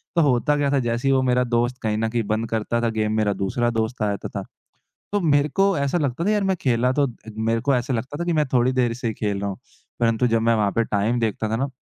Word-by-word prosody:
तो 170 - +4
होता 145 0 +2
क्या 140 -1 +1
था 140 - +3
जैसे 120 +1 -1
ही - - +4
वो 135 -1 +3
मेरा 125 0 +2
दोस्त 120 +1 0
कहीं 105 -1 -1
न 110 +1 0
कहीं 115 0 -1
बंद 110 +1 -1
करता 115 +1 -1
था 120 - +1
गेम 110 -1 -1
मेरा 105 -2 +2
दूसरा 120 +5 -1
दोस्त 115 +1 -2
आ 105 - +2
जाता 100 -1 -3
था। - - -5 0.7
तो 205 - +1
मेरे 145 -3 +3
को 195 0 +2
ऐसा 140 +4 0
लगता 145 -1 -1
था - - +2
यार 210 -1 +1
मैं 190 -1 +1
खेला 125 -1 +2
तो 145 - +4 0.3
मेरे 115 +1 0
को 140 - +1
ऐसा 125 +1 -1
लगता 125 +5 -3
था - - -1
कि 175 - 0
मैं 155 -2 +2
थोड़ी 125 0 +3
देर 125 -2 +1
से 120 0 -4
ही 110 - -1
खेल 105 -2 -2
रहा 100 - -1
हूँ, 95 - -6 0.4
परंतु 115 +1 +2
जब 115 -1 +1
मैं 115 +1 +3
वहाँ 105 -2 +1
पे 115 - +1
टाइम 110 +3 0
देखता 110 -1 -1
था 110 - 0
ना, 135 +5 -1
120 Hz, 280 wpm, -23 LUFS, 110-135 Hz, 0.7 s, तो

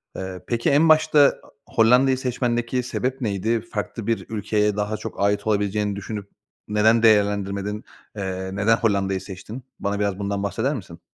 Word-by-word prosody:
Eee, 95 -1 -6
peki 120 -1 0
en 155 +3 +4
başta 155 -1 +5 0.2
a - - -18 0.2
Hollanda'yı 125 +3 +4
seçmendeki 125 -1 -1
sebep 130 +2 -3
neydi? 110 +1 0
Farklı 115 -1 -5
bir 115 -1 -1
ülkeye 105 -1 0
daha 105 +1 -2
çok 115 - -8
ait 100 +1 +1
olabileceğini 105 -1 0
düşünüp 100 0 -6 0.4
neden 110 +2 +3
değerlendirmedin? 105 -1 +2 0.3
Eee, 95 -2 -4
neden 105 +3 +3
Hollanda'yı 100 -4 0
seçtin? 105 +6 -9 0.2
Bana 100 0 -2
biraz 100 -2 -1
bundan 100 0 -2
bahseder 135 +8 -1
misin? 85 -8 -9
105 Hz, 150 wpm, -23 LUFS, 100-115 Hz, 0.4 s, başta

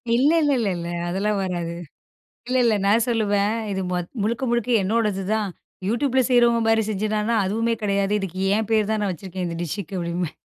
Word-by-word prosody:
இல்லல்லல. 255 - +2 0.2
அதெல்லாம் 200 +3 0
வராது. 175 -2 -3 0.8
இல்ல 255 - +1
இல்ல. 230 -2 +4
நான் 220 +3 +4
சொல்லுவேன். 210 -2 +1 0.2
"இது 190 - -2
மொத் 180 -1 -2
முழுக்க 230 +4 -1
முழுக்க 240 0 0
என்னோடது 210 -1 0
தான். 210 -3 -1 0.4
YouTubeல 260 +3 +1
செய்றவங்க 240 -1 +4
மாரி 225 0 +4
செஞ்சதான்னா? 215 +2 0
அதுவுமே 230 +3 0
கெடையாது. 200 0 +1
இதுக்கு 185 -1 -5 0.2
என் 220 -1 -1
பேர் 215 -1 +2
தான் 215 -1 0
நான் 195 -3 0
வச்சுருக்கேன். 185 +1 -5
இந்த 170 -1 -4
டிஷ்ஷுக்கு" 190 +3 -4
அப்டின்ம்பேன். 170 -1 -3
210 Hz, 160 wpm, -23 LUFS, 190-230 Hz, 0.8 s, இல்ல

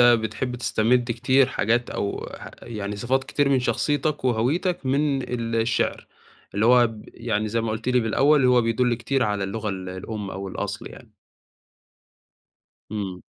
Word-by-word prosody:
بتحب 120 +1 +3
تستمد 120 +1 +1
كتير 130 +3 +3
حاجات 120 -1 0
أو 100 - -3
ح - - -9
يعني 105 -3 -5
صفات 130 +5 0
كتير 145 -1 +1
من 135 -2 +3
شخصيتك 145 +2 0
وهويتك 135 - 0
من 140 0 +1 0.3
الشِعر، 115 0 0 0.5
اللي 105 +3 +2
هو 125 0 +6
ب 110 -2 -10
يعني 110 -2 -1
زي 115 +2 0
ما 115 -1 -2
قُلت 110 +3 -3
لي 125 0 +3
بالأول 135 +5 +3
هو 125 -1 +5
بيدُل 120 +2 +1
كتير 125 +3 -1
على 105 -3 0
اللغة 105 +2 -3
ال 95 -1 -4
الأم 100 +2 -5
أو 95 +1 -5
الأصل - - -5
يعني. - - -13 1.8
إمم. 95 -4 -4
120 Hz, 155 wpm, -24 LUFS, 110-130 Hz, 1.8 s, هو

